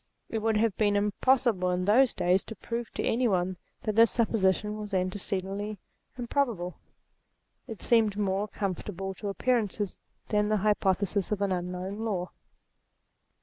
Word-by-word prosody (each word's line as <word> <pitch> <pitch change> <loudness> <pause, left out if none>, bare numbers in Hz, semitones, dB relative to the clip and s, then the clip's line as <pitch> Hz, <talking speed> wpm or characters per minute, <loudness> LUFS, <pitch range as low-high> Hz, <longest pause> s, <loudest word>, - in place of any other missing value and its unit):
It 225 - -1
would 220 0 +1
have 220 -3 +2
been 205 -2 +2
impossible 210 -1 +2
in 180 0 0
those 235 +5 +4
days 180 +2 +2
to 225 - -8
prove 235 +3 -4
to - - -2
any 245 +2 +2
one 185 -2 0 0.3
that 215 - -1
this 230 0 +7
supposition 210 -3 +1
was 210 -2 -4
an 185 0 +1
tecedently 200 +1 -3 0.4
improbable. 235 -8 -1 0.9
It 225 -4 -8
seemed 220 -4 +3
more 200 0 0
conformable 195 -1 -4
to 210 - -4
appearances 210 -2 0 0.3
than 210 -1 +2
the 215 - +3
hypothesis 200 -1 +1
of 205 -1 0
an 200 - 0
unknown 180 +2 -3
law. 195 -5 -2
205 Hz, 145 wpm, -28 LUFS, 190-225 Hz, 0.9 s, this